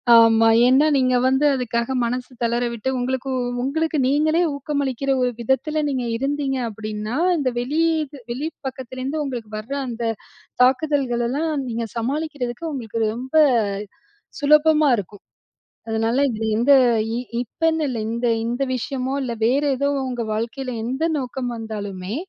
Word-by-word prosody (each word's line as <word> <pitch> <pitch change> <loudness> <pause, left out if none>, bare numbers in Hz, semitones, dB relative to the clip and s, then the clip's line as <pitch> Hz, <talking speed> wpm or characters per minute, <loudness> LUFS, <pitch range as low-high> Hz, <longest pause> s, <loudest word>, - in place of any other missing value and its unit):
ஆமா. 225 0 +6 0.2
ஏன்னா 265 +4 +5
நீங்க 255 -1 +3
வந்து 265 +3 +3
அதுக்காக 240 0 -1
மனசு 250 +2 -3
தளர 235 +1 +1
விட்டு, 235 +3 -3
உங்களுக்கு 260 +1 -2 0.3
உங்களுக்கு 315 +3 0
நீங்களே 310 +5 +2
ஊக்கமளிக்கிற 275 -2 -2
ஒரு 250 - +2
விதத்தில, 285 +6 0
நீங்க 260 -3 -1
இருந்தீங்க 275 +1 -1
அப்படின்னா, 215 +1 -5 0.2
இந்த 270 -4 +1
வெளி 280 +6 -1 0.5
வெளி 275 +6 -2 0.2
பக்கத்திலேருந்து 260 +3 -4
உங்களுக்கு 240 -6 -5
வற்ர 230 +6 -5
அந்த 235 0 -5 0.6
தாக்குதல்களெல்லாம், 265 +1 +1 0.2
நீங்க 230 -1 -2
சமாளிக்கிறதுக்கு 275 +2 -3
உங்களுக்கு 230 -4 -4
ரொம்ப 260 +5 -6 1.1
சுலபமா 300 +1 +5
இருக்கும். 205 +1 -7 0.7
அதுனால, 225 +2 0
இதில 220 0 -2
எந்த 280 +4 +5 0.7
இப்பன்னு 320 +5 0
இல்ல, 235 -3 -3
இந்த 235 +1 -1 0.2
இந்த 245 +3 -1
விஷயமோ 260 +2 -3
இல்ல, 240 -2 -3
வேற 275 +4 +2
ஏதோ 280 +2 +1 0.2
உங்க 240 -2 -3
வாழ்க்கையில 240 +4 -3
எந்த 265 +6 -1
நோக்கம் 250 -1 -4
வந்தாலுமே, 205 -3 -5
255 Hz, 125 wpm, -22 LUFS, 235-280 Hz, 1.1 s, ஆமா